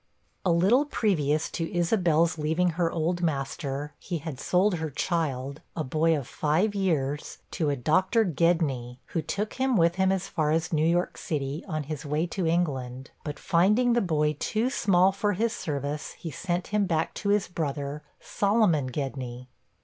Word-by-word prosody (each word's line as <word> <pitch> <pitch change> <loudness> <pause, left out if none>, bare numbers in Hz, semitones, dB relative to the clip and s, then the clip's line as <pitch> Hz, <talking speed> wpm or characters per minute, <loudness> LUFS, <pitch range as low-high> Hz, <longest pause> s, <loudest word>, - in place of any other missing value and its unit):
A 180 - +2
little 200 - +4
previous 155 - +1
to 165 -1 -3
Isabel's 170 -3 +2
leaving 160 +4 +1
her 165 0 0
old 175 +2 -1
master, 145 -2 -2
he 175 - -3
had 145 -3 -6
sold 180 +1 +2
her 160 -1 -2
child, 140 -3 -2
a 160 - -1
boy 155 +4 +2
of 135 -4 -5
five 165 +8 +1
years, 150 -7 -1
to 160 -5 0
a 140 - +1
Dr. 185 - +2
Gedney, 155 -8 +1
who 165 - -1
took 200 +8 -3
him 260 -3 +3
with 170 +1 +3
him 190 0 +3
as 195 0 -1
far 155 -6 0
as 160 +2 0
New 155 +1 +3
York 175 +1 0
city, 145 0 -3
on 155 -4 -2
his 145 0 -5
way 150 +2 0
to 175 0 -2
England; 135 -7 -1
but 150 -1 -5
finding 210 +8 +3
the 240 - +3
boy 150 -4 +1
too 230 +4 0
small 190 -5 +4
for 205 +1 0
his 225 +4 0
service, 145 - -4
he 165 - -7
sent 175 +4 -3
him 210 -1 +1
back 160 -2 0
to 200 - -3
his 205 -1 +2
brother, 145 -3 -3 0.2
Solomon 200 - +2
Gedney. 125 -2 -5
165 Hz, 170 wpm, -27 LUFS, 150-185 Hz, 0.2 s, little